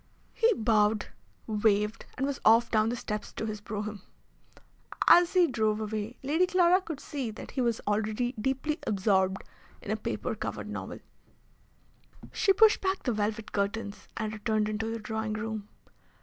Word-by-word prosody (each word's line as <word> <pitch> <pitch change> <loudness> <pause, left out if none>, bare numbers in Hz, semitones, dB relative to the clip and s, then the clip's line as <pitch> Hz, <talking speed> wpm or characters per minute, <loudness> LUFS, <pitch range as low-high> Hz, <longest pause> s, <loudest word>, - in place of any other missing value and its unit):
He 460 +1 +3
bowed, 215 -3 +2 0.4
waved, 210 0 +1
and 265 - 0
was 280 -2 -2
off 230 +2 +5
down 215 0 +3
the 240 - -1
steps 210 -3 -5
to - - -4
his 215 -1 -5
brougham. 210 -1 -5 1.1
As 350 0 +7
he 365 -2 +6
drove 220 -6 0
away, 215 +2 -4
Lady 320 +7 +2
Clara 365 0 +4
could 320 -6 -6
see 275 -6 -4
that 215 - -9
he 265 - -1
was 235 -2 +1
already 215 +4 0
deeply 265 +6 -2
absorbed 190 -2 +1 0.4
in - - -6
a - - +2
paper - - -3
covered - - -5
novel. - - -6 1.3
She 395 - +3
pushed 430 +2 +5
back 380 0 -1
the 245 - 0
velvet 215 +1 -2
curtains, 200 +1 -3
and 215 -1 -2
returned 215 0 0
into 220 +1 -2
the 230 - -3
drawing 220 0 -3
room. 215 -1 -4
220 Hz, 160 wpm, -29 LUFS, 210-265 Hz, 1.3 s, As